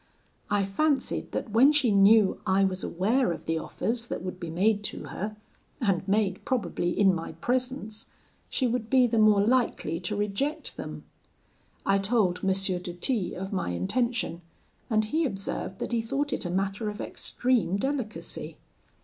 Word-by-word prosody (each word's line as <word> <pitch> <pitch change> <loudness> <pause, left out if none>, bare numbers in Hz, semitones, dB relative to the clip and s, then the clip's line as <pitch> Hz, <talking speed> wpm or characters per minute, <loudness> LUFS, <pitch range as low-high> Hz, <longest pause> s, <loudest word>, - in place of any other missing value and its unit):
I 200 -1 +2
fancied 275 +9 0
that 225 - -3
when 250 +7 +6
she 285 -6 +3
knew 200 +1 +5
I 190 +1 +4
was 190 -1 0
aware 215 +5 +1
of 170 - -6
the 165 0 0
offers 235 +7 -3
that - - -4
would 185 0 -5
be 170 - -5
made 205 +5 +2
to - - -4
her, 210 +2 -4 0.4
and 195 -7 0
made 195 -2 +1
probably 185 -8 -1
in 195 -2 +6
my 165 -2 -4
presence, 250 -3 -2 0.4
she 260 - 0
would 235 -2 -1
be 260 -1 +5
the 230 -2 +1
more 215 -2 +6
likely 230 -9 +1
to 180 +3 -3
reject 210 +9 -2
them. - - -7 0.8
I 195 0 +3
told 195 -3 +2
M. - - 0
de 185 -2 -1
T 195 +3 -1
of 190 +2 -5
my 185 - -1
intention, 175 - -1 0.5
and 215 -2 +2
he 315 +10 0
observed 195 -6 -3
that - - -4
he 235 -1 +1
thought 275 +5 -2
it - - -2
a - - -4
matter 195 +4 -1
of 210 - -7
extreme 240 -7 0
delicacy. 260 -1 -3
210 Hz, 165 wpm, -27 LUFS, 190-245 Hz, 0.8 s, when